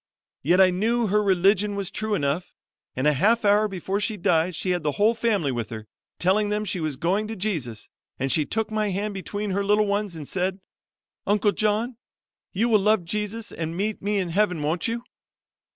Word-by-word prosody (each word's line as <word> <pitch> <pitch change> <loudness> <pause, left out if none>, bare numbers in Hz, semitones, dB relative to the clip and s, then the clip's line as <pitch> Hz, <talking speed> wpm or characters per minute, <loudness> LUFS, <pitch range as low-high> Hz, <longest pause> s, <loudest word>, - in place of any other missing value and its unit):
Yet 175 +6 +3
I 185 -1 +6
knew 225 +6 +1
her 210 +1 +2
religion 200 +1 +3
was 195 -1 -3
true 215 +1 -1
enough, 145 +1 -2 0.4
and 130 - -1
a 150 - +5
half 215 - +2
hour 205 +1 +4
before 195 0 -3
she 215 0 -1
died 170 -1 +1
she 185 +3 -1
had 175 -1 0
the 150 -2 -1
whole 215 +7 +3
family 220 - 0
with 120 -4 -3
her, 110 -1 -7 0.3
telling 205 +3 +2
them 210 +1 -1
she 185 -2 -2
was 155 -3 -2
going 185 +9 0
to 225 - -5
Jesus, 160 - -3 0.3
and 135 +1 -1
she 155 - +3
took 220 +7 -2
my 215 -1 0
hand 205 +2 -2
between 205 +1 -4
her 200 +2 0
little 210 +1 +3
ones 200 -2 -1
and 150 -3 -7
said, 190 +1 -1 0.7
'Uncle 205 0 +3
John, 215 +4 0 0.5
you 220 +5 +1
will 220 -3 +4
love 210 -3 +2
Jesus 210 +4 -3
and 165 +1 -4
meet 210 +2 -2
me 205 +1 0
in 185 -3 -1
Heaven, 180 -1 +1
won't 160 +7 0
you?' 235 +1 -3
200 Hz, 200 wpm, -25 LUFS, 175-210 Hz, 0.7 s, I